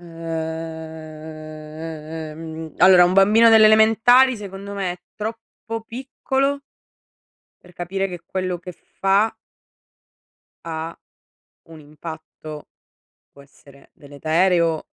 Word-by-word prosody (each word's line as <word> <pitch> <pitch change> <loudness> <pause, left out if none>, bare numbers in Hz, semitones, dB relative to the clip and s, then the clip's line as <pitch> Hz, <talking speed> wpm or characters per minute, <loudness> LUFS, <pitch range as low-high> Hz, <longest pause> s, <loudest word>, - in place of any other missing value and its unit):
Uhm, 160 -1 -7
allora 185 -1 +8
un 180 - +2
bambino 210 +4 +6
delle 220 -1 +8
elementari 225 +4 +5
secondo 200 0 -8
me 190 -3 -2
è 180 - -12 0.2
troppo 225 +1 -6
piccolo 270 +3 -2 1.0
per 180 - -16
capire 190 +3 -2
che 175 -2 -7
quello 185 -1 -3
che 180 +1 -9 0.3
fa 200 +3 +3 1.3
ha 165 0 -5 0.7
un 160 -1 -12
impatto, 155 0 -10 0.6
può 140 - -16
essere 140 0 -20
deleterio 160 +3 +1
170 Hz, 90 wpm, -22 LUFS, 160-200 Hz, 1.3 s, allora